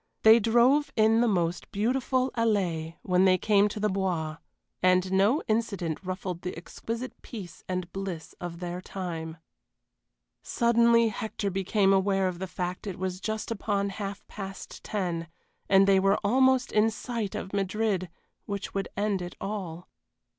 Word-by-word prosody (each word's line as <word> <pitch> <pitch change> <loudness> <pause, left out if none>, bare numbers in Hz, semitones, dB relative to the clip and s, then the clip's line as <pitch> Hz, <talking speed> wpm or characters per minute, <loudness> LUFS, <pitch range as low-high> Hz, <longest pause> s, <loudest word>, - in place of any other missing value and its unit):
They 220 +1 +8
drove 240 +7 +4
in 220 +1 +4
the 240 - +3
most 175 -4 -1
beautiful 255 +4 0
allée 180 -8 0
when 185 0 +3
they 185 -1 +5
came 205 +1 +4
to 210 - -5
the 210 - +2
Bois 180 -5 -1 0.4
and 185 0 +3
no 200 +10 +3
incident 200 -8 -1
ruffled 185 -1 -4
the 180 -2 -5
exquisite 230 +8 -6
peace 200 -8 -9
and 180 -1 -3
bliss 190 -5 -5
of 175 0 -6
their 175 0 -4
time. 170 -4 -5 1.0
Suddenly 235 -1 +3
Hector 215 -2 -3
became 195 +1 +2
aware 195 0 +2
of 180 -1 -4
the 190 - -3
fact 180 +2 -4
it 190 - -4
was 185 0 -3
just 220 0 -3
upon 200 -2 -1
half 200 0 -6
past 195 -1 -8
ten, 175 -5 -2 0.4
and 195 0 +6
they 195 -1 +5
were 195 +2 +3
almost 260 +3 +3
in 215 +1 +4
sight 225 -2 -4
of 190 - -5
Madrid, 195 -1 0 0.4
which 200 -1 -4
would 195 0 -2
end 205 -2 0
it 175 0 -6
all. 185 -4 -5
195 Hz, 155 wpm, -28 LUFS, 180-220 Hz, 1.0 s, They